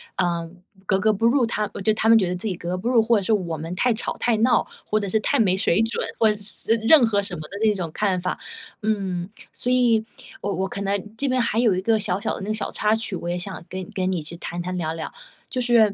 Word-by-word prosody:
呃， 170 -2 -1 0.4
格 190 - +2
格 215 +3 +3
不 215 +2 -1
入 250 +1 +4
他 215 -2 -1
我 - - -6
觉 215 - +3
得 - - +2
他 220 - 0
们 230 - +8
觉 195 -5 +2
得 180 - -1
自 180 +5 -3
己 190 - -1
格 170 0 -6
格 180 - -1
不 195 +6 -4
入， 240 -3 +5
或 230 0 +3
者 200 - -1
是 220 - +2
我 175 -6 -1
们 165 +3 -5
太 245 +5 +2
吵 220 - -3
太 235 -2 +1
闹， 240 +3 +3 0.2
或 215 - +1
者 200 -2 -3
是 220 - +2
太 280 - +1
没 190 -4 +3
水 190 +1 +2
准， 225 +1 -1
或 220 -1 +4
者 210 - -4
是 210 +2 -2
任 295 -4 +8
何 205 -3 +2
什 195 -3 -4
么 155 - -7
的 200 - -7
那 215 -1 +4
种 175 -4 -4
看 195 -3 +1
法。 180 - -2 0.4
嗯， 190 -4 -1 0.2
所 245 - -2
以， 235 -3 +3 0.4
我 200 - -1
我 190 +2 -1
可 200 - -5
能 200 +2 -2
这 280 - -1
边 255 -1 +2
还 230 -1 0
有 225 -6 +4
一 185 - -1
个 220 +2 +2
小 195 -3 -1
小 215 - -1
的 - - -7
那 195 - -5
个 215 - 0
小 - - -3
插 215 +1 +2
曲， 225 -3 -3
我 175 - -5
也 175 - -1
想 185 -1 -7
跟 185 +1 -4
你 - - -6
跟 185 -2 0
你 180 -3 -1
去 155 +3 -8
谈 175 +1 -5
谈、 180 +1 -3
聊 160 -2 -2
聊。 165 - -5 0.4
就 255 - -3
是 235 -4 +4
205 Hz, 310 characters per minute, -23 LUFS, 180-225 Hz, 0.4 s, 们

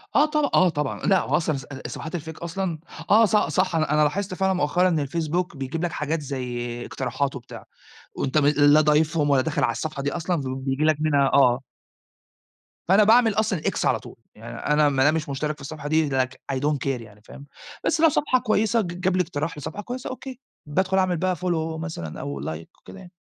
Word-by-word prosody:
آه 290 - +6
طبع 300 -2 0
آه 185 - +5
طبعًا. 150 -3 -3
لأ 195 -2 +4
هو - - +1
أصلًا 155 -4 -1
ص 135 - -8 0.2
الصفحات 160 +2 -6
الfake 160 0 -9
أصلًا 170 -1 -3 0.3
آه 225 +2 +6
ص 215 - +1
صح 185 -4 +1
أنا 155 -2 +1
أنا 150 - +3
لاحظت 185 +6 -1
فعلًا 190 +1 +1
مؤخرًا 180 +2 +2
إن 155 -4 0
الFacebook 170 +4 -2
بيجيب 135 +5 -4
لك 175 - -2
حاجات 150 +2 -2
زي 120 -3 -4
اقتراحات 135 +2 -3
وبتاع، 125 - -10 0.5
وأنت 135 +2 -1
م 145 - +4
لا 145 +1 +5
ضايفهم 150 0 +2
ولا 140 -2 +4
داخل - - -1
على - - +3
الصفحة 140 +4 -4
دي 145 - -1
أصلًا 175 +1 -1 0.2
وبييجي 135 +2 -2
لك 155 -1 +4
منها 145 -3 +3
آه. 125 -2 +5 1.3
فأنا 195 +4 +6
باعمل 225 +1 +5
أصلًا 210 -5 0
X - - -1
على - - +2
طول. 120 +1 -12 0.2
يعني 115 +2 -9 0.2
أنا 150 0 +4
ما 135 -2 +2
دام 150 +3 +4
مش 155 -2 -3
مشترك 150 +2 -2
في 145 - -17
الصفحة 145 +1 -7
دي 155 -1 +2
Like 130 -1 0 0.2
I - - -1
don't 145 +1 0
care - - -4
يعني، 105 -2 -15
فاهم، 140 +6 -13 0.4
بس 320 - +1
لو 325 - +7
صفحة 255 -3 +1
كويسة 220 -1 +1
ج - - -3
جاب 185 0 +1
لي - - +4
اقتراح 155 -2 -4
لصفحة 155 +7 -6
كويسة 250 +2 -5
أوكي. 260 -1 -8 0.3
بادخُل 190 +6 0
أعمل 185 -2 +2
بقى 185 +2 0
follow 160 -2 -2
مثلًا 160 - -6
أو 70 -1 -5
like 80 +3 -5
وكده 195 - -13
يعني. 185 -2 -13
155 Hz, 210 wpm, -24 LUFS, 140-185 Hz, 1.3 s, لو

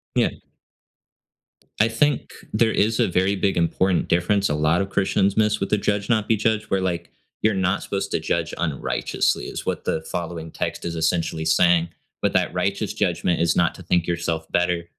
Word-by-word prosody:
Yeah. - - +3 1.5
I 110 - +5
think 140 +5 0 0.2
there 110 +1 +3
is 110 +2 +1
a - - +4
very 95 +2 +1
big 95 0 0
important 90 +2 +1
difference 95 +4 +2
a 75 - 0
lot 75 +4 +2
of 95 - -3
Christians 95 0 +1
miss 105 -1 +2
with 100 - -2
the 105 - +3
“Judge 100 0 -1
not 110 -3 +2
be 115 - +3
judged,” 110 0 -1
where, 95 - +2
like, 85 -2 -3 0.3
you're 110 0 +4
not 95 0 0
supposed 100 0 -3
to - - +1
judge 80 +1 -1
unrighteously, 80 -6 -1
is - - -5
what - - -3
the 80 - 0
following 85 0 -5
text - - -4
is 85 -1 -3
essentially 80 0 0
saying, 85 +1 +3 0.3
but - - +1
that - - +2
righteous - - -1
judgment 90 -2 0
is 85 -1 +2
not - - +2
to - - -11
think 85 -2 +1
yourself 85 -2 -2
better, 90 -1 +1
90 Hz, 190 wpm, -23 LUFS, 85-100 Hz, 1.5 s, I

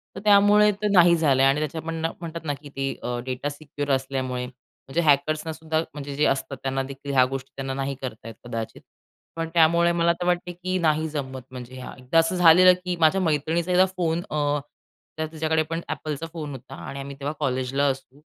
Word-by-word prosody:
तर - - -5
त्यामुळे 210 0 +6
तर 210 - +1
नाही 175 -2 +6
झालं 140 -5 +3
आणि 135 +2 +4
त्याच्या 155 +1 -3
पण 165 0 -4
ना 165 +1 0
म्हणतात 165 -1 -7
ना 145 - 0
की 145 - -11
ते 135 0 -1
अ, 120 0 -2
डेटा 130 +2 -3
सिक्युअर 145 -1 -5
असल्यामुळे. 130 -1 -3
म्हणजे 130 +4 -6
हॅकर्सनासुद्धा 155 +1 +1
म्हणजे 145 -1 -6
जे 150 +2 +2
असतात 135 0 -1
त्यांना 135 0 -1
देखील 140 +1 -7
ह्या 130 -1 +6
गोष्टी 135 0 -5
त्यांना 135 -1 -4
नाही 135 0 -3
करतायेत 115 -3 -7
कदाचित. 115 -2 -5 0.5
पण 165 0 -3
त्यामुळे 170 +1 +4
मला 170 0 +2
तर - - -1
वाटते 180 0 0
की 185 +1 -3
नाही 155 0 +2
जमत 135 -3 -5
म्हणजे 130 0 -9
हां. - - -8
एकदा 130 +6 +2
असं 165 +3 +1
झालेलं 180 +1 +7
की 180 - -1
माझ्या 165 +4 +4
मैत्रिणीचा 165 +2 0
एकदा 185 +1 +5
फोन 165 -1 0
अ, 145 -1 +1 0.6
त्यात 160 - -2
तिज्या 155 0 -3
कडे 160 0 +3
पण 165 0 -2
Appleचा 155 +1 -4
फोन 155 -3 -5
होता 135 0 -9
आणि 140 - -6
आम्ही 140 0 -7
तेव्हा 145 +2 -3
कॉलेजला 135 0 0
असू. 135 +1 -6
150 Hz, 200 wpm, -24 LUFS, 135-165 Hz, 0.6 s, झालेलं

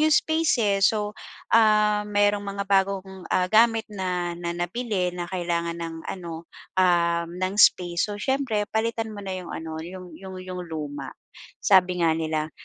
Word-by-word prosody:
'yong 310 0 +4
space, 315 -6 +2
eh. 200 -2 +2
So, 210 -1 +1 0.4
ah, 210 -2 +4
mayro'ng 205 0 +2
mga 200 0 -3
bagong, 190 -1 0
ah, 180 0 +2
gamit 225 0 +4
na 180 -3 -2
nabili 180 +3 -2
na 175 - -3
kailangan 170 -2 -2
ng 165 -1 -4
ano, 170 -3 -6 0.3
um, 170 -2 +3
ng 185 +1 -1
space. 175 -1 +4
So, 205 - -4
siyempre 265 -6 0
palitan 225 0 -1
mo 205 -1 -8
na 190 - -4
'yong 180 -2 -7
ano, 160 -1 -5
'yong 180 0 -9
'yong 190 -1 -9
'yong 180 -1 -5
luma. 145 -4 -5 0.5
Sabi 180 -2 +4
nga 165 - +4
nila, 155 -1 -2
185 Hz, 155 wpm, -25 LUFS, 170-210 Hz, 0.5 s, yong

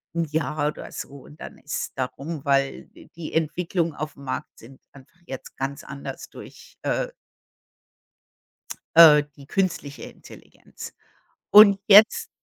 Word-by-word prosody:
1 170 - 0
Jahr 150 -1 -1
oder - - -9
so - - -7
und 150 - -17
dann - - -10
ist 150 - -5
da 130 -2 -1
rum, 145 +3 -8
weil 135 -1 0
d - - -18
die 165 -2 -8
Entwicklung 165 +1 -1
auf 150 0 -6
dem 140 - -15
Markt 130 - -5
sind 130 +4 -16
einfach 140 +5 -19
jetzt 135 - -9
ganz 135 +1 -5
anders 140 0 -9
durch, - - -14
äh - - -2 1.9
äh, 155 -3 +8
die 140 -1 -15
künstliche 170 -7 -3
Intelligenz. - - -13 0.6
Und 205 -2 +8
jetzt 220 - +6
150 Hz, 140 wpm, -23 LUFS, 140-170 Hz, 1.9 s, äh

